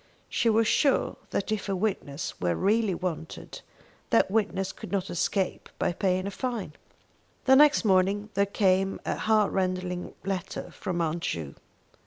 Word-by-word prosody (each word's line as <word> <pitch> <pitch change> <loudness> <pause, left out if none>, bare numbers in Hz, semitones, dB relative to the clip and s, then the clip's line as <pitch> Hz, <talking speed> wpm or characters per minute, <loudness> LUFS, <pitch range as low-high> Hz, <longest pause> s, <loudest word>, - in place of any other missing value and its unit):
She 235 - +2
was 225 0 +3
sure 280 +3 +2
that 200 - -2
if 210 -1 -2
a 195 - +1
witness 180 -7 -3
were 90 -1 +1
really 210 - +2
wanted, 170 -3 -5 0.5
that 230 -5 +3
witness 195 -3 0
could - - -10
not 195 -2 -1
escape 185 +2 -1
by - - 0
paying 185 +1 0
a 200 - -3
fine. 230 - -3 0.7
The 265 - +7
next 290 -3 +6
morning 200 +2 +2
there 200 +1 +2
came 195 -1 +2
a - - 0
heartrending 185 -4 0
letter 190 -2 -4
from 180 -4 -3
Aunt 165 +1 -1
Ju. 80 - -3
195 Hz, 150 wpm, -27 LUFS, 180-215 Hz, 0.7 s, The